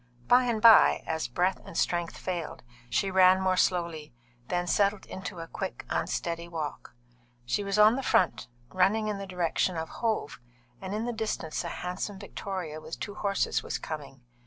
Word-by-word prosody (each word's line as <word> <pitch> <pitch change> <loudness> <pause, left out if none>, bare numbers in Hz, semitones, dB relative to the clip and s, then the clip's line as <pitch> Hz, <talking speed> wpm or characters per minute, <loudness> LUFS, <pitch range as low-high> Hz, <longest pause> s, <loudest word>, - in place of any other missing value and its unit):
By 250 +1 +5
and 235 -3 0
by, 225 0 +7
as 160 -4 -2
breath 180 +10 0
and - - -8
strength 175 -1 0
failed, 175 -7 -4 0.3
she 190 +11 0
ran 185 0 +6
more 190 -1 +2
slowly, 170 -7 0 0.3
then 175 0 -1
settled 200 +2 +1
into 185 -1 -7
a 165 - -7
quick, - - -5
unsteady 170 0 -2
walk. 155 -7 -6 0.5
She 205 - 0
was 200 0 -1
on 215 +3 +6
the - - -1
front, 185 - +2 0.2
running 205 +4 +2
in 205 -2 -3
the 195 - -6
direction 180 -1 0
of 160 0 -4
Hove, 220 -10 -2 0.4
and 190 +1 -4
in 220 +2 -2
the 240 - -2
distance 215 -9 -3
a - - -4
handsome 180 +4 -4
victoria 180 -6 -6
with 160 - -8
two 205 - -5
horses 200 -1 0
was - - -3
coming. 145 -4 -7
185 Hz, 175 wpm, -28 LUFS, 165-205 Hz, 0.5 s, by